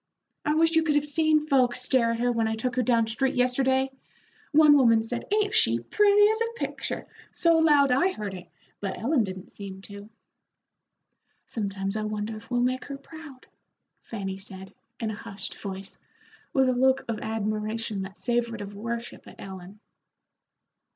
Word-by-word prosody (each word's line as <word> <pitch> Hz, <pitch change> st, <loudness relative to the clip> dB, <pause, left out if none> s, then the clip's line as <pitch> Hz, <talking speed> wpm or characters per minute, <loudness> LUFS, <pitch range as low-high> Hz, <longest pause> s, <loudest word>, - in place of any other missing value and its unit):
I 300 Hz, -, +1 dB
wish 325 Hz, +1 st, +4 dB
you 325 Hz, -1 st, +4 dB
could 310 Hz, -2 st, +1 dB
have 295 Hz, 0 st, +2 dB
seen 310 Hz, 0 st, +2 dB
folks 255 Hz, -4 st, +2 dB
stare 250 Hz, -2 st, +2 dB
at 230 Hz, -, -4 dB
her 245 Hz, +1 st, +2 dB
when 230 Hz, -2 st, +1 dB
I 220 Hz, -, -1 dB
took 245 Hz, +3 st, -2 dB
her 255 Hz, -, +2 dB
down 235 Hz, -1 st, +3 dB
street 265 Hz, +5 st, -1 dB
yesterday. 260 Hz, +1 st, +2 dB, 0.6 s
One 300 Hz, -1 st, +7 dB
woman 230 Hz, -5 st, +5 dB
said, 235 Hz, +1 st, -4 dB
'Ain't 415 Hz, -1 st, +2 dB
she 115 Hz, +1 st, +3 dB
pretty 415 Hz, -, +4 dB
as 440 Hz, +1 st, 0 dB
a 460 Hz, 0 st, -1 dB
picture,' -, -, -4 dB, 0.3 s
so 335 Hz, -1 st, +3 dB
loud 295 Hz, -4 st, +5 dB
I 270 Hz, +9 st, +4 dB
heard 210 Hz, -, -5 dB
it, 180 Hz, -1 st, -9 dB, 0.3 s
but 195 Hz, -2 st, -4 dB
Ellen 245 Hz, -, +2 dB
didn't 190 Hz, -2 st, -7 dB
seem 195 Hz, -2 st, -8 dB
to." 200 Hz, +1 st, -9 dB, 1.4 s
"Sometimes 195 Hz, -2 st, -3 dB
I 215 Hz, -, -1 dB
wonder 215 Hz, +1 st, -3 dB
if 215 Hz, +1 st, -12 dB
we'll 245 Hz, -1 st, +1 dB
make 255 Hz, +1 st, -1 dB
her 280 Hz, -, -6 dB
proud," 285 Hz, -2 st, -12 dB, 0.6 s
Fanny 195 Hz, -3 st, -5 dB
said, 190 Hz, -1 st, -11 dB, 0.3 s
in 225 Hz, -2 st, -2 dB
a -, -, -5 dB
hushed 195 Hz, -1 st, -8 dB
voice, 195 Hz, 0 st, -7 dB, 0.5 s
with 265 Hz, -1 st, +3 dB
a 255 Hz, -, +3 dB
look 260 Hz, +1 st, +2 dB
of 225 Hz, -2 st, -3 dB
admiration 215 Hz, 0 st, -2 dB
that 190 Hz, -1 st, -7 dB
savored 235 Hz, -2 st, -1 dB
of 200 Hz, 0 st, -7 dB
worship 230 Hz, +3 st, -6 dB
at -, -, -12 dB
Ellen. 190 Hz, +1 st, -10 dB
235 Hz, 175 wpm, -26 LUFS, 210-275 Hz, 1.4 s, One